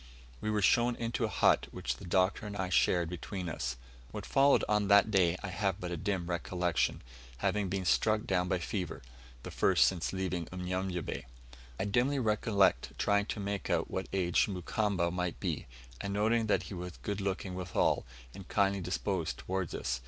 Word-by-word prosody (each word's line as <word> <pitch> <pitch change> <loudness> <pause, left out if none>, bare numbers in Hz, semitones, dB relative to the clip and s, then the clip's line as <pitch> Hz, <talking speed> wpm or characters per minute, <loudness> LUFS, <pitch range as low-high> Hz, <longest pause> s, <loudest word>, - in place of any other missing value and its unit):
We 110 - -2
were 105 -1 +1
shown 120 +4 +4
into 115 0 -1
a - - -2
hut, - - +3
which - - -3
the - - -10
Doctor 95 +4 +1
and 100 0 -6
I 95 -2 -2
shared 90 -2 +3
between 90 +2 -5
us. 75 -6 -3 0.3
What 100 +5 -6
followed 140 0 +4
on 105 -1 +2
that 100 +1 +6
day 90 -3 +3
I 100 - -3
have 95 +1 -1
but 90 -3 -5
a - - -1
dim 95 +1 -2
recollection, 90 0 -1 0.3
having 100 +4 0
been 95 0 -2
struck 110 +4 +2
down 90 -5 +1
by 95 - +1
fever 90 - -4 0.4
the - - -7
first - - +4
since 85 -3 0
leaving 90 -3 -2
Unyanyembe. 90 -3 -3 0.5
I - - 0
dimly 120 +8 +2
recollect 105 -4 +2
trying 100 0 +2
to 110 - -3
make 100 0 -3
out - - 0
what 95 - -3
age 90 -3 +2
Mukamba 95 -1 0
might 90 -1 -2
be, - - -3 0.3
and 100 0 -3
noting 110 +2 +2
that 105 - +2
he - - -8
was 90 -1 -6
good 100 -1 -2
looking 95 -1 -2
withal, 90 -1 +1 0.3
and 95 -3 -10
kindly 100 -1 +2
disposed 90 -1 -2
towards 95 -2 -3
us. - - -2
95 Hz, 180 wpm, -32 LUFS, 90-105 Hz, 0.5 s, that